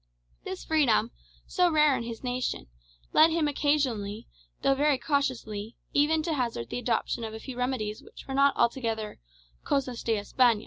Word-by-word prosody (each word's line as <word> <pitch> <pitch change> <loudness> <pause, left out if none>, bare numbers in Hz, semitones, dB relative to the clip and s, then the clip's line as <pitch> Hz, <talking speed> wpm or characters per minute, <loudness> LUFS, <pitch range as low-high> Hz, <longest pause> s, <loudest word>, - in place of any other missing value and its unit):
This 190 - -6
freedom, 245 -7 +3 0.3
so 360 -2 +2
rare 300 -3 +4
in 245 - -2
his 230 +1 -7
nation, 250 - -2 0.5
led 315 +1 +7
him 325 -2 +1
occasionally, 270 -9 0 0.4
though 275 - +4
very 285 0 +2
cautiously, 250 -7 -2 0.2
even 310 +2 +3
to 325 0 -1
hazard 235 - -2
the - - -2
adoption 235 0 -1
of 220 -1 -5
a - - -7
few 260 +2 -8
remedies 245 -4 -2
which - - -13
were 270 - -4
not 275 +1 +4
altogether 230 -3 0 0.4
"cosas 260 -4 -1
de 225 -2 0
Espana." 230 +2 +3
255 Hz, 165 wpm, -28 LUFS, 225-285 Hz, 0.5 s, led